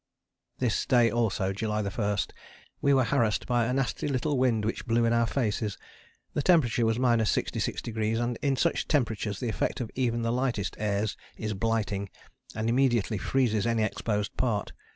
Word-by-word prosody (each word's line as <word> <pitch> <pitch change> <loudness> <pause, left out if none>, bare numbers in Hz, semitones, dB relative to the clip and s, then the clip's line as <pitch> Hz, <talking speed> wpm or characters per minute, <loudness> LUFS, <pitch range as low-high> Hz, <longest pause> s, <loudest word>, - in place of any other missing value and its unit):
This 125 -4 0
day 120 -2 +4
also 105 -4 0
(July 105 +1 -1
1) 100 0 -1 0.6
we 140 - +3
were 135 -2 +5
harassed 115 -5 +1
by 120 -2 +2
a 125 - 0
nasty 135 +1 -1
little 145 +2 0
wind 120 -5 +2
which 115 - -3
blew 115 0 +3
in 115 - +2
our 115 0 +3
faces. 110 -4 -1 0.6
The - - 0
temperature 125 -9 +3
was 110 0 +1
66°, 115 -2 0
and 120 0 -1
in 140 -2 +1
such 170 +6 0
temperatures 110 -8 0
the 125 - -2
effect - - -1
of 120 -4 -4
even 120 -3 0
the 115 0 0
lightest 120 -6 -1
airs 105 0 0 0.2
is 110 -1 -3
blighting, 105 -2 -1 0.5
and 110 +1 -2
immediately 120 -4 +2
freezes 115 -2 +1
any 115 -1 +2
exposed 105 -1 -2
part. 110 -5 0
115 Hz, 165 wpm, -28 LUFS, 105-125 Hz, 0.6 s, were